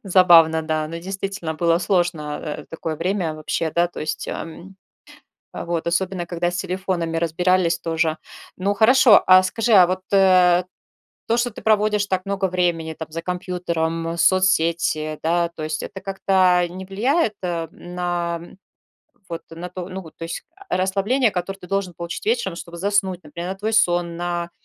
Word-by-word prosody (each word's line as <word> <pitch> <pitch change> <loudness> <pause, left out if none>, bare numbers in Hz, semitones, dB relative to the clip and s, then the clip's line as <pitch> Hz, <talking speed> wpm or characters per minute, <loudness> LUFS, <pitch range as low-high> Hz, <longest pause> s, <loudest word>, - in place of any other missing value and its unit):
Забавно, 170 -4 +6
да. 155 -1 -1
Ну, 165 +1 -6
действительно, 195 -2 -4
было 165 +1 +2
сложно, 175 -5 0
э, 150 -2 -5
такое 160 -1 -4
время 175 -2 -1
вообще, 155 +1 -2
да, 170 0 +3
то - - -9
есть, 155 - -4
а, - - -4
м. 180 +3 -11 0.8
Вот, 170 -1 -3
особенно, 180 +1 -1
когда 175 0 -2
с 175 - -4
телефонами 180 -3 -2
разбирались 170 +1 +1
тоже. 165 -1 0 0.4
Ну, 195 +2 0
хорошо, 225 0 +6
а 185 0 +8
скажи, 225 +5 -1
а 180 -3 +8
вот, 185 +1 -2
э, 185 -2 +5 0.7
то, 230 - +3
что 245 +1 0
ты 210 - -11
проводишь 210 -1 +2
так 185 -1 -1
много 195 -1 -1
времени, 175 -3 -1
там, 160 - -7
за 165 - -4
компьютером, 170 -2 -2
соцсети, 170 -3 +2
да, 170 +1 +1
то 155 - -7
есть 155 0 -3
это 190 - -7
как-то 185 -2 +2
не 185 +2 -8
влияет, 220 - +1
э, 170 -2 -2
на, 175 -1 -3
м, 175 - -14 0.7
вот 170 -1 -5
на 170 +2 -7
ту 180 0 -6
ну 190 0 -6
вот, 160 -3 -14
то 165 - -7
есть, 165 - -6
а, 395 -1 -4
расслабление, 200 +7 +1
которое 195 +1 -4
ты 180 - -12
должен 195 -1 -2
получить 170 0 -6
вечером, 225 -5 0
чтобы 170 0 -9
заснуть, 190 -1 0
например, 170 +4 -6
на - - -9
твой 220 +2 -2
сон, 175 -5 +2
на, 175 0 -3
175 Hz, 175 wpm, -22 LUFS, 165-190 Hz, 0.8 s, а